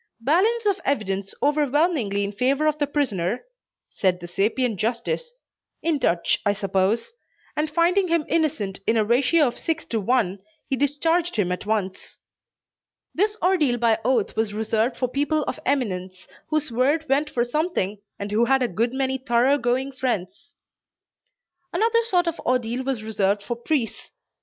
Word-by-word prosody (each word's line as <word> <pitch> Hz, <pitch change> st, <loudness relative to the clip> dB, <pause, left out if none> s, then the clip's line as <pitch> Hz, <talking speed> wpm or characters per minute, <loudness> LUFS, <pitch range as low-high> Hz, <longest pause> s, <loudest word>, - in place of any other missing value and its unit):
"Balance 400 Hz, -, +2 dB
of 400 Hz, -2 st, +1 dB
evidence 195 Hz, -7 st, -2 dB
overwhelmingly 290 Hz, -, +1 dB
in 200 Hz, -, -2 dB
favor 265 Hz, +7 st, +1 dB
of 305 Hz, 0 st, +1 dB
the 290 Hz, -, +1 dB
prisoner," 240 Hz, -, -1 dB, 0.5 s
said 185 Hz, -2 st, +1 dB
the 175 Hz, -, -8 dB
sapient 210 Hz, +5 st, 0 dB
justice 235 Hz, -, -2 dB, 0.5 s
(in 320 Hz, -3 st, +1 dB
Dutch 170 Hz, -8 st, +1 dB
I 205 Hz, -, +2 dB
suppose,) 195 Hz, -, 0 dB, 0.4 s
and 305 Hz, +1 st, 0 dB
finding 350 Hz, +5 st, +2 dB
him 335 Hz, -3 st, +1 dB
innocent 250 Hz, -12 st, 0 dB
in 225 Hz, -, +3 dB
a 215 Hz, -, +3 dB
ratio 270 Hz, +7 st, +3 dB
of 245 Hz, -, -2 dB
six 320 Hz, -1 st, -2 dB
to 225 Hz, -2 st, -2 dB
one, 200 Hz, -3 st, +1 dB, 0.3 s
he 270 Hz, -, 0 dB
discharged 325 Hz, +5 st, +1 dB
him 195 Hz, -5 st, +1 dB
at 180 Hz, +3 st, -4 dB
once. 200 Hz, -4 st, -3 dB, 1.0 s
This 420 Hz, +3 st, +1 dB
ordeal 315 Hz, -10 st, +3 dB
by 230 Hz, -2 st, +2 dB
oath 245 Hz, -5 st, +1 dB
was 220 Hz, -2 st, -1 dB
reserved 220 Hz, +2 st, 0 dB
for 255 Hz, -, 0 dB
people 295 Hz, +4 st, 0 dB
of -, -, -4 dB
eminence, 190 Hz, -9 st, -2 dB, 0.2 s
whose 305 Hz, -4 st, 0 dB
word 280 Hz, +7 st, +1 dB
went 280 Hz, +3 st, +1 dB
for 240 Hz, -, 0 dB
something, 245 Hz, -, -1 dB, 0.2 s
and 200 Hz, 0 st, -5 dB
who 225 Hz, +3 st, +3 dB
had 265 Hz, +1 st, +3 dB
a -, -, +2 dB
good 230 Hz, +6 st, -1 dB
many 265 Hz, 0 st, 0 dB
thorough 260 Hz, +2 st, +2 dB
going 255 Hz, +3 st, 0 dB
friends. 240 Hz, -, -4 dB, 1.2 s
Another 460 Hz, +1 st, +2 dB
sort 360 Hz, -5 st, +3 dB
of 335 Hz, -1 st, -2 dB
ordeal 250 Hz, 0 st, -1 dB
was 260 Hz, -5 st, -2 dB
reserved 205 Hz, -2 st, 0 dB
for 240 Hz, -, -3 dB
priests. 240 Hz, 0 st, -2 dB
250 Hz, 160 wpm, -24 LUFS, 210-305 Hz, 1.2 s, in